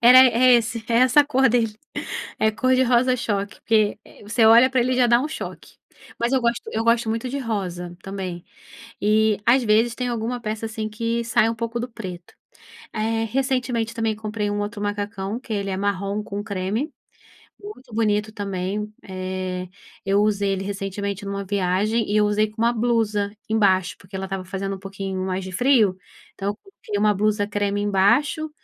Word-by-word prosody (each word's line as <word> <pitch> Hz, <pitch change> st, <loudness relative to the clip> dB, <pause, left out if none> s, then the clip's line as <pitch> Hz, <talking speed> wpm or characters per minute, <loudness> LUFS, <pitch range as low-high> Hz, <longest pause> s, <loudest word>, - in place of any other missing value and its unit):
Era 245 Hz, +2 st, +9 dB
é 255 Hz, 0 st, +7 dB
esse, 230 Hz, -1 st, 0 dB
é 230 Hz, -, +1 dB
essa 255 Hz, +3 st, +6 dB
cor 265 Hz, -2 st, +3 dB
dele, 225 Hz, -2 st, +1 dB, 0.6 s
é 220 Hz, -, +3 dB
cor 255 Hz, +4 st, +1 dB
de 260 Hz, -, +4 dB
rosa 250 Hz, +1 st, +3 dB
choque, 205 Hz, -4 st, -3 dB
que 215 Hz, -2 st, +2 dB, 0.2 s
você 215 Hz, +3 st, +1 dB
olha 235 Hz, +4 st, +7 dB
para 260 Hz, -, +2 dB
ele 255 Hz, +2 st, +1 dB
já 250 Hz, -1 st, +4 dB
dá 235 Hz, +1 st, +4 dB
um 290 Hz, -, -1 dB
choque, 315 Hz, -, -8 dB, 0.4 s
mas 235 Hz, +2 st, 0 dB
eu 265 Hz, -, +3 dB
gosto 235 Hz, 0 st, 0 dB
eu 225 Hz, +1 st, -1 dB
gosto 230 Hz, -1 st, +3 dB
muito 225 Hz, +3 st, -2 dB
de 280 Hz, +3 st, -3 dB
rosa 180 Hz, -7 st, -4 dB
também, 185 Hz, -3 st, -5 dB, 0.6 s
e 215 Hz, 0 st, +3 dB
às 250 Hz, +2 st, +5 dB
vezes 225 Hz, +2 st, +3 dB
tem 250 Hz, -, -2 dB
alguma 240 Hz, +1 st, -2 dB
peça, 215 Hz, 0 st, -3 dB
assim, 220 Hz, -1 st, -4 dB
que 230 Hz, +2 st, -2 dB
sai 225 Hz, -1 st, +2 dB
um 230 Hz, -, -2 dB
pouco 230 Hz, +1 st, -3 dB
do 240 Hz, -, -3 dB
preto. 180 Hz, -6 st, -8 dB, 0.6 s
Eh, 225 Hz, +1 st, 0 dB
recentemente 250 Hz, -3 st, 0 dB
também 225 Hz, -1 st, 0 dB
comprei 210 Hz, -1 st, -3 dB
um 205 Hz, -, -2 dB
outro 205 Hz, 0 st, -4 dB
macacão 205 Hz, +1 st, -3 dB
que 250 Hz, -3 st, -6 dB
ele 200 Hz, -1 st, -2 dB
é 190 Hz, -, -2 dB
marrom 200 Hz, +1 st, -1 dB
com 205 Hz, 0 st, -5 dB
creme, 210 Hz, -, -2 dB, 0.7 s
muito 270 Hz, -, -11 dB
bonito 215 Hz, -1 st, +1 dB
também, 200 Hz, 0 st, -3 dB
eh, 185 Hz, -1 st, -4 dB, 0.4 s
eu 195 Hz, +1 st, +3 dB
usei 205 Hz, -2 st, +1 dB
ele 190 Hz, 0 st, -3 dB
recentemente 200 Hz, 0 st, -4 dB
em -, -, -6 dB
uma 200 Hz, 0 st, -3 dB
viagem 200 Hz, +4 st, 0 dB
e 210 Hz, 0 st, +3 dB
usei 210 Hz, +1 st, +2 dB
com 215 Hz, +1 st, -7 dB
uma 235 Hz, +1 st, +4 dB
blusa 220 Hz, -3 st, 0 dB, 0.2 s
embaixo, 190 Hz, -4 st, +3 dB
porque -, -, -18 dB
porque 190 Hz, -, -10 dB
ela 190 Hz, -, -3 dB
estava 190 Hz, -1 st, -4 dB
fazendo 195 Hz, +1 st, -3 dB
um 190 Hz, -, -11 dB
pouquinho 195 Hz, -1 st, -4 dB
mais 190 Hz, 0 st, -2 dB
de 190 Hz, -, -7 dB
frio, 220 Hz, -3 st, +3 dB, 0.4 s
então 195 Hz, 0 st, -3 dB
eu 205 Hz, -, -3 dB
coloquei 230 Hz, -, -7 dB
uma 210 Hz, 0 st, +4 dB
blusa 205 Hz, +1 st, +1 dB
creme 205 Hz, -1 st, -1 dB
embaixo, 230 Hz, +11 st, +2 dB
215 Hz, 190 wpm, -23 LUFS, 200-235 Hz, 0.7 s, Era